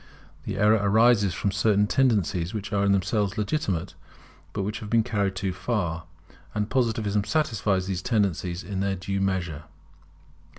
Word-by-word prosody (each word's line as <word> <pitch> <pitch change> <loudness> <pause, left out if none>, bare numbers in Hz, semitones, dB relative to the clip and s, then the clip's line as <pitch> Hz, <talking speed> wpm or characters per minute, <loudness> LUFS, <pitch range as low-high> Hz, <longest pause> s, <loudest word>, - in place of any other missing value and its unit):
The - - -4
error 105 +2 +4
arises 105 -2 +4
from 100 - -1
certain 105 +1 +2
tendencies 105 -7 +1
which 105 0 -5
are 100 0 +2
in 100 - +3
themselves 100 +1 0
legitimate, 100 - -1 0.6
but 100 - -3
which 105 +2 -3
have 105 - -8
been 115 0 +3
carried 100 -5 -1
too 95 -1 -2
far; 90 -5 -2 0.5
and 105 0 -1
Positivism 110 -5 +1
satisfies 105 - 0
these 95 -1 -3
tendencies 95 -5 -1
in 95 +2 -4
their 100 0 0
due 95 +1 -3
measure. 90 -6 -2
100 Hz, 155 wpm, -26 LUFS, 95-110 Hz, 0.6 s, error